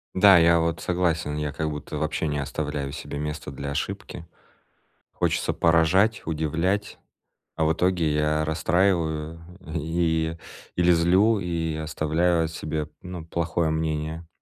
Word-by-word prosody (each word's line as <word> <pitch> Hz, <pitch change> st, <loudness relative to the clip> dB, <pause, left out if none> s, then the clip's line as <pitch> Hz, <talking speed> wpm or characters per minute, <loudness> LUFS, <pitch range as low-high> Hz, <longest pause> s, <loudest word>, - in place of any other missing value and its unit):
Да, 95 Hz, 0 st, +8 dB
я 85 Hz, 0 st, +5 dB
вот 85 Hz, 0 st, -1 dB
согласен, 85 Hz, -4 st, 0 dB
я 75 Hz, -1 st, -2 dB
как 80 Hz, +2 st, -2 dB
будто 75 Hz, 0 st, -5 dB
вообще 80 Hz, +1 st, -1 dB
не 75 Hz, -1 st, -1 dB
оставляю 70 Hz, 0 st, -3 dB
себе 70 Hz, -, -6 dB
место 75 Hz, -1 st, -4 dB
для 70 Hz, +1 st, -5 dB
ошибки. 95 Hz, +3 st, -4 dB, 0.9 s
Хочется -, -, 0 dB
поражать, 85 Hz, +6 st, +3 dB
удивлять, 80 Hz, +6 st, -1 dB, 0.6 s
а 80 Hz, -, 0 dB
в 80 Hz, -, +3 dB
итоге 85 Hz, -2 st, +1 dB
я 75 Hz, +1 st, +1 dB
расстраиваю 80 Hz, -1 st, 0 dB, 0.3 s
и 80 Hz, 0 st, -1 dB, 0.4 s
или 90 Hz, 0 st, +4 dB
злю, 95 Hz, +6 st, +4 dB
и 85 Hz, -3 st, -2 dB
оставляю 80 Hz, +2 st, +1 dB
о -, -, 0 dB
себе, 75 Hz, -1 st, -4 dB
ну, 90 Hz, -3 st, -7 dB
плохое 85 Hz, 0 st, -1 dB
мнение. 80 Hz, +1 st, -2 dB
80 Hz, 135 wpm, -25 LUFS, 75-85 Hz, 0.9 s, Да